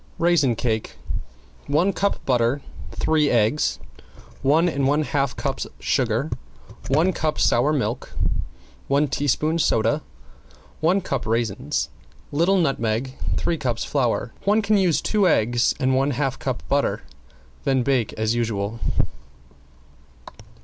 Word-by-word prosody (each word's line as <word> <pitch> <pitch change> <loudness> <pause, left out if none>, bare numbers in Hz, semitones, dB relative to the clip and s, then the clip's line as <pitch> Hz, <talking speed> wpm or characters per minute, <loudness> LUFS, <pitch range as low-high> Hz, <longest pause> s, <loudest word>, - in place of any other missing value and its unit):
~RAISIN 165 -8 +3
CAKE~ 110 -1 -2 0.7
One 170 +7 +2
cup 200 +1 -1
butter, 125 +2 +1 0.3
three 155 -2 +2
eggs, 115 +5 +2 0.6
one 155 +6 +4
and 140 -5 +1
one 145 +2 +2
half 140 -3 -1
cups - - -3
sugar, - - 0 0.6
one 160 +7 +3
cup 155 -1 -1
sour 125 +6 +3
milk, 125 -4 -2 0.8
one 140 +2 +2
teaspoon 145 +3 0
soda, 130 +1 +2 0.8
one 180 +5 +2
cup 135 -9 -3
raisins, 115 -3 -1 0.4
little 170 +7 +3
nutmeg, 130 -6 0 0.2
three 165 - 0
cups 120 -5 -1
flour. 125 -4 0
One 210 +2 +3
can 210 +1 +3
use 185 -5 +3
two 205 -3 +2
eggs 120 -3 +2
and 130 0 +2
one 135 +2 +2
half 135 -2 -1
cup 130 -2 -4
butter; 140 0 0 0.6
then 130 -2 +2
bake 125 -4 +1
as 110 +1 0
usual. 115 -2 -2
140 Hz, 120 wpm, -23 LUFS, 120-155 Hz, 0.8 s, one